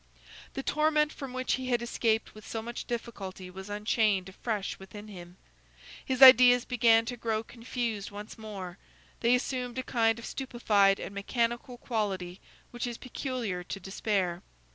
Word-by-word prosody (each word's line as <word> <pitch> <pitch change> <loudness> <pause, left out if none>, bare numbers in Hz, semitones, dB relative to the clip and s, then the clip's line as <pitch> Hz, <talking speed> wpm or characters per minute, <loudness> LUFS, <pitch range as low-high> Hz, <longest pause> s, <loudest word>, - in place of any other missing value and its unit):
The 270 - -3
torment 305 0 +2
from 275 -2 -7
which 255 0 -1
he 260 -1 -2
had 240 -2 +1
escaped 225 -2 0
with 215 - -13
so 225 -1 -4
much 235 +1 -6
difficulty 195 -6 -6
was 190 +2 -9
unchained 210 -2 +1
afresh 205 0 -3
within 205 +2 -10
him. 175 -2 -11 0.7
His 260 0 +3
ideas 250 -1 +9
began 230 -2 +4
to 245 - -4
grow 225 -2 -1
confused 230 -3 -4
once 205 +1 -8
more; 200 -4 -8 0.4
they 240 +1 +4
assumed 250 -1 -3
a 260 - -1
kind 225 -2 +2
of 235 - -8
stupefied 210 -7 +2
and - - -6
mechanical 235 +4 -2
quality 195 -7 -3 0.3
which 240 0 -3
is 240 -1 -5
peculiar 245 -8 -4
to 195 - -5
despair. 190 -2 -1
225 Hz, 155 wpm, -29 LUFS, 200-245 Hz, 0.7 s, ideas